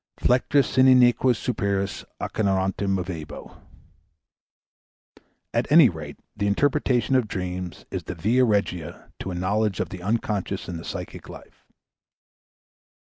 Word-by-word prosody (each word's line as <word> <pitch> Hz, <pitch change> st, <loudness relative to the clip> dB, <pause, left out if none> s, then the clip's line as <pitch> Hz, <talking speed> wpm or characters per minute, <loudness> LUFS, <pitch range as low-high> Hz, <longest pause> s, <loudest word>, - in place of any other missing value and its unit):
"Flectere 130 Hz, +3 st, +3 dB
si 130 Hz, -, +1 dB
nequeo 130 Hz, -1 st, +5 dB
superos, 100 Hz, -4 st, -2 dB, 0.2 s
Acheronta 95 Hz, -1 st, -1 dB
movebo." 90 Hz, -5 st, -4 dB, 1.9 s
At -, -, -1 dB
any 155 Hz, -5 st, +8 dB
rate 75 Hz, -4 st, -8 dB, 0.2 s
the 100 Hz, 0 st, -1 dB
interpretation 135 Hz, +3 st, +1 dB
of 125 Hz, -4 st, +2 dB
dreams 90 Hz, -2 st, -5 dB
is -, -, -4 dB
the 90 Hz, -, -5 dB
via 110 Hz, +10 st, +2 dB
regia 100 Hz, -7 st, -1 dB
to -, -, -5 dB
a 90 Hz, -, -4 dB
knowledge 100 Hz, +2 st, 0 dB
of -, -, -2 dB
the 90 Hz, -, -8 dB
unconscious 100 Hz, -1 st, -2 dB
in 90 Hz, -, -5 dB
the 80 Hz, -, -9 dB
psychic -, -, -7 dB
life. -, -, -14 dB
100 Hz, 125 wpm, -24 LUFS, 90-125 Hz, 1.9 s, any